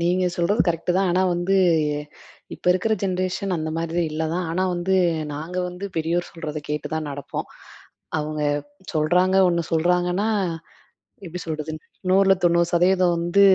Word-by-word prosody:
நீங்க 180 +2 +2
சொல்றது 195 +6 +1
கரெக்ட் 165 +1 -1
தான், 195 -1 +2
ஆனா, 180 +2 +2
வந்து 175 +3 +1 1.0
இப்போ - - -15
இருக்கிற 185 +5 0
ஜென்ரேஷன் 185 0 -1
அந்த 155 -1 -3
மாதிரி 165 +1 -1
இல்ல 155 +1 -3
தான், 180 -1 -1
ஆனா, 185 +3 0
வந்து 185 +2 +1 0.4
நாங்க 160 +5 -6
வந்து 180 +3 -6
பெரியோர் 170 +2 -1
சொல்றத 155 -2 -5
கேட்டு 150 0 -2
தான் 155 -1 -3
நடப்போம். 140 -1 -5 0.7
அவுங்க 155 0 -3 0.5
சொல்றாங்க 180 +5 +3
ஒண்ணு 170 -1 +1
சொல்றாங்கன்னா 180 +5 +2 1.0
எப்டி 180 +1 -6
சொல்றது, 155 -1 -4 0.4
100ல 195 +1 +5
90% 175 +1 +3
வந்து 175 +4 +2
175 Hz, 135 wpm, -23 LUFS, 160-185 Hz, 1.0 s, 100ல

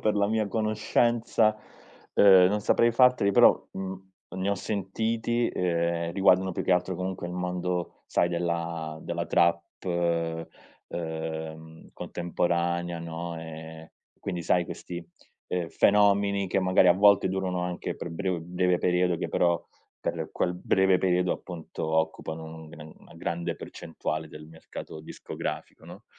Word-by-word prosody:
per 105 - +1
la 100 0 +3
mia 110 0 0
conoscenza, 110 +1 +2 0.6
ehm, 95 -2 +8
non 105 +2 0
saprei 115 +2 +4
farteli 125 -3 +4
però, - - +7 0.2
mhmm, 95 0 -6 0.3
ne 95 +1 -1
ho 100 - +2
sentiti, 110 +4 -1
ehm, 85 -1 -1
riguardano 95 -1 +4
più - - -3
che - - +3
altro 90 +1 +1
comunque 90 0 -4
il 90 - -6
mondo 90 -1 -3
sai 85 - +2
della 85 -2 -2
della - - -3
trap, 85 0 +3 1.3
ehm, 80 -1 -6
contemporanea, 85 0 -1
no, 85 0 -5
ehm. 80 0 -9 0.3
Quindi 90 -3 -4
sai 90 +1 +2
questi, 85 0 -7 0.4
ehm, 90 -2 -2
fenomeni 100 +1 +3
che 95 +1 +1
magari 95 0 +4
a - - +8
volte 100 0 +5
durano 95 -1 -1
anche 90 0 -3
per - - -6
brev 90 +1 -2
breve 90 +1 +1
periodo 90 -1 +2
che - - -3
però 85 -1 +2 0.4
per - - -3
quel 90 - 0
breve 95 +1 +3
periodo 90 -1 +2
appunto 85 -4 -7
occupano 80 0 -1
un 80 0 -10
gr 80 -1 -11
una - - -18
grande 85 +1 -3
percentuale 80 -1 -5
del 75 0 -11
mercato 80 -1 -9
discografico, 80 - -6
no, - - -12
90 Hz, 140 wpm, -27 LUFS, 85-95 Hz, 1.3 s, ehm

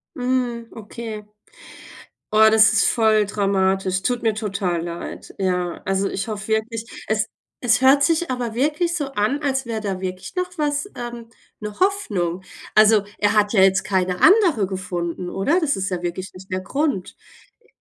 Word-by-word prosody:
Mhm, 245 -3 -1
okay. 220 -1 -7 1.1
Oh, 220 0 +7
das 220 -1 +6
ist 215 - +3
voll 220 -2 +3
dramatisch, 190 -2 0
tut 245 +2 -1
mir 225 - +2
total 200 -5 -2
leid. 170 0 -7
Ja, 180 -2 -1
also 195 +1 0
ich 195 +3 -4
hoffe 210 -1 -5
wirklich, 220 +1 -1 0.2
es 220 0 0 0.4
es 245 0 +4
hört 270 +2 +6
sich 330 0 +1
aber 240 -3 -3
wirklich 305 +6 0
so 285 -5 -3
an, 260 +5 0
als 265 -2 0
wäre 225 -2 -3
da 195 -3 -3
wirklich 185 0 -6
noch 365 0 -1
was 295 +4 -1
ähm, 240 -1 -7 0.3
'ne 210 -1 -7
Hoffnung. 205 - 0 0.3
Also, 215 -1 +6 0.2
er 205 0 +2
hat 210 -1 +3
ja 195 - +5
jetzt 190 0 +4
keine 185 -3 0
Andere 365 - +5
gefunden, 180 -2 -4
oder? 285 - +1
Das 305 -4 +1
ist 190 +1 -2
ja 180 -1 -2
wirklich 175 +2 -5
nicht 185 +1 -13
der 185 0 -1
Grund. 275 - -2 0.4
Äh 455 - -31
215 Hz, 170 wpm, -22 LUFS, 190-250 Hz, 1.1 s, Oh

